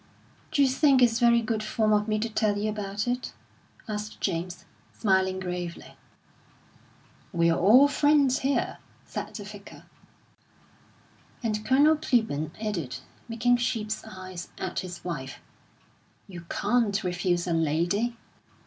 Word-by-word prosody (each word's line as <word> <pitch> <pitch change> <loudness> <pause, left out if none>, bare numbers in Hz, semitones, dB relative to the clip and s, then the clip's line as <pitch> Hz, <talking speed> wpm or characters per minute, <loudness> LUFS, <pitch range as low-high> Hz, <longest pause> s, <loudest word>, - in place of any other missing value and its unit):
"D'you 285 -3 +4
think 270 0 +4
it's 230 -1 +3
very 235 -1 +4
good 220 -1 -1
form 215 0 +1
of 210 0 +2
me 215 -1 +1
to 220 +2 -1
tell 215 -2 0
you 215 +1 -1
about 205 +1 -3
it?" 245 +1 -2 0.5
asked 210 0 -5
James, 175 -1 -3 0.3
smiling 190 -2 +1
gravely. 180 -2 -5 1.4
"We're 170 -3 +3
all 225 +12 +6
friends 285 -2 +3
here," 275 +1 -1 0.3
said - - -6
the 210 - -6
Vicar. 205 0 -11 1.6
And 215 -2 -1
Colonel 290 +6 +4
Clibborn 220 - 0
added, 180 - -3 0.3
making 245 +2 +2
sheep's 220 -3 -2
eyes 185 -4 -8
at - - -3
his 180 -2 -7
wife: 135 -7 -5 0.9
"You 175 -3 -10
can't 220 -4 +1
refuse 180 -1 0
a 175 - -1
lady!" 170 +9 0
210 Hz, 125 wpm, -27 LUFS, 180-235 Hz, 1.6 s, all